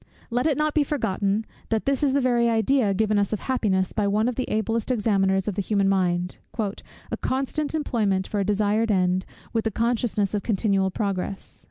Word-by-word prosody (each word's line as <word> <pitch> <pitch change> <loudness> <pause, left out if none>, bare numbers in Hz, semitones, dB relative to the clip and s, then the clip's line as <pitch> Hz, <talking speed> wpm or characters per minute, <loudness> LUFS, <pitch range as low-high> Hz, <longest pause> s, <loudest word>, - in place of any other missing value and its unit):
Let 245 +5 +1
it 295 -4 +1
not 305 0 +1
be 300 - +3
forgotten, 215 -7 -1 0.2
that 220 -1 0
this 275 -1 +1
is 280 -3 +2
the 280 - +2
very 240 -2 +3
idea 225 0 +2
given 215 0 +2
us 200 +1 0
of 215 - -2
happiness 195 -8 0
by 210 -2 +1
one 210 +3 +2
of 250 - 0
the 255 +2 -3
ablest 220 +2 -1
examiners 195 -5 +1
of 210 - 0
the 200 - -1
human 200 0 +1
mind; 180 -2 0 0.2
"a 210 -3 -5
constant 280 +4 -1
employment 210 -10 0
for 210 - -2
a - - +2
desired 210 +2 +1
end, 185 -2 +1 0.3
with 225 -1 +1
the 225 - +1
consciousness 225 -2 0
of 205 - 0
continual 195 -3 +1
progress." 195 -1 -4
215 Hz, 195 wpm, -24 LUFS, 195-240 Hz, 0.3 s, be